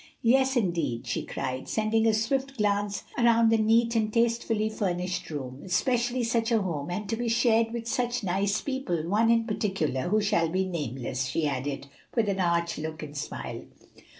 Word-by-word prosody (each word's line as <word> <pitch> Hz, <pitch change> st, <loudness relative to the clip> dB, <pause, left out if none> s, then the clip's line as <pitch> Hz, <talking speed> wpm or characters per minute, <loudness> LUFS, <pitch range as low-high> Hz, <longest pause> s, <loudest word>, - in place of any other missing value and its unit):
"Yes, 265 Hz, +3 st, +4 dB
indeed!" 170 Hz, -, -1 dB
she 115 Hz, -, -2 dB
cried, 130 Hz, 0 st, -4 dB
sending 220 Hz, +1 st, +2 dB
a 220 Hz, -, +4 dB
swift 265 Hz, +5 st, -1 dB
glance 205 Hz, -1 st, 0 dB, 0.2 s
around 230 Hz, -1 st, +5 dB
the 225 Hz, -, +4 dB
neat 230 Hz, +2 st, +3 dB
and 215 Hz, -1 st, +1 dB
tastefully 230 Hz, -1 st, +1 dB
furnished 180 Hz, -4 st, -2 dB
room, 135 Hz, -3 st, -6 dB
"especially 240 Hz, +6 st, +1 dB
such 230 Hz, 0 st, 0 dB
a 225 Hz, -3 st, +3 dB
home, 155 Hz, -5 st, -3 dB
and 205 Hz, +4 st, -3 dB
to 225 Hz, -, -1 dB
be 235 Hz, +1 st, -2 dB
shared 230 Hz, -1 st, +3 dB
with 230 Hz, -1 st, -5 dB
such 245 Hz, 0 st, -1 dB
nice 200 Hz, +2 st, 0 dB
people; 260 Hz, -, -2 dB
one 215 Hz, +5 st, +3 dB
in 230 Hz, 0 st, +4 dB
particular 195 Hz, -, -1 dB
who 215 Hz, +3 st, +3 dB
shall 205 Hz, -6 st, +2 dB
be 185 Hz, +3 st, 0 dB
nameless," 135 Hz, -6 st, -3 dB
she 160 Hz, +3 st, -1 dB
added, 140 Hz, 0 st, -3 dB, 0.3 s
with 230 Hz, -3 st, +2 dB
an 195 Hz, -1 st, -1 dB
arch 170 Hz, -2 st, +1 dB
look 155 Hz, 0 st, -5 dB
and 145 Hz, -1 st, -8 dB
smile. 65 Hz, -, -5 dB
210 Hz, 180 wpm, -27 LUFS, 165-230 Hz, 0.3 s, around